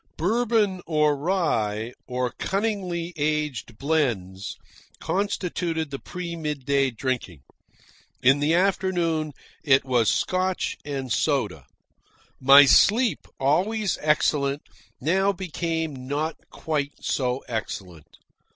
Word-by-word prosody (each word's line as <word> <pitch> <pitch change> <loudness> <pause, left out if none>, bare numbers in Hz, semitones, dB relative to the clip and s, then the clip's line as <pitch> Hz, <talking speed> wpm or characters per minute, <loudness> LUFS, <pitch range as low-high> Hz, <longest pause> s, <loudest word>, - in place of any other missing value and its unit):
Bourbon 210 0 +1
or 150 -2 +3
rye, 125 - -1
or 125 -1 -1
cunningly 190 -4 -2
aged 150 -6 -2
blends, 120 - -1 0.4
constituted 175 -5 -2
the 135 - -4
pre 175 -1 -6
midday 140 -3 0
drinking. 115 - -4 0.8
In 135 +3 +5
the 145 +1 +1
late 175 - +4
afternoon 175 -5 0 0.3
it 135 -3 +4
was 120 -5 +2
Scotch 185 0 0
and 135 -3 -4
soda. - - 0 0.7
My 140 +2 +9
sleep, 225 - +4
always 190 +9 +1
excellent, 145 -2 +1 0.4
now 190 +8 +2
became 160 -7 -3
not 150 +3 -1
quite 145 -3 -2
so 125 -1 -1
excellent. 95 - -6
150 Hz, 100 wpm, -25 LUFS, 130-180 Hz, 0.8 s, My